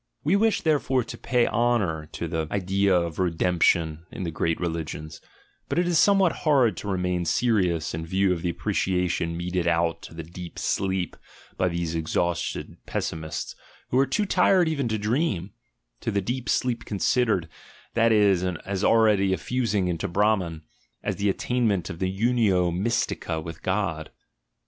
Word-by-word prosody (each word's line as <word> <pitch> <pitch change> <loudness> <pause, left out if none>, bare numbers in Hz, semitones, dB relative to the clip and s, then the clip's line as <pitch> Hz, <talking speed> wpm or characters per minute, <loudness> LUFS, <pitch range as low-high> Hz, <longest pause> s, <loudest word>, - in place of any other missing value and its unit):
We 170 - +3
wish, 220 +1 +2
therefore, 140 -5 +2
to - - -8
pay 120 -1 +1
honour 105 -10 0
to 85 - -4
the 80 -1 -2
idea 100 0 +1
of 85 -2 -4
"redemp 90 -1 0
tion" 80 -1 +2
in - - -5
the 85 - -3
great 80 +1 -1
religions, 80 -2 -4 0.5
but - - -1
it 175 0 +2
is 170 -3 +3
somewhat 195 -2 +4
hard 135 -8 +3
to - - -6
remain 90 -2 0
serious 90 -3 +1
in 80 +1 -3
view 95 +1 +2
of 85 - -4
the 90 - -1
appreciation 90 -1 -1
meted 90 0 -2
out 85 0 +1
to - - -11
the 80 - -6
deep 85 +2 -9
sleep 95 -2 -1 0.4
by 90 - +1
these 85 -2 -2
exhausted 85 +1 -2
pessmists 80 -1 -4 0.4
who 125 - +2
are 135 - +3
too 210 - 0
tired 185 -2 +4
even 140 -5 -1
to 110 -1 -1
dream 105 - -1 0.3
— - - -50
to - - -2
the 100 - +1
deep 120 +6 -3
sleep 120 -2 0
considered, 105 -3 +1 0.5
that 115 0 +3
is, 100 -4 +4
as 95 +2 -3
already 105 -4 +4
a - - 0
fusing 110 -7 0
into 90 +3 -2
Brahman, 90 -4 0 0.4
as - - -2
the 100 0 +1
attainment 105 -3 0
of 80 - -8
the 95 - 0
unio 100 -4 +2
mystica 95 -5 -1
with 80 0 -8
God. 95 -5 -1
95 Hz, 170 wpm, -25 LUFS, 85-115 Hz, 0.5 s, somewhat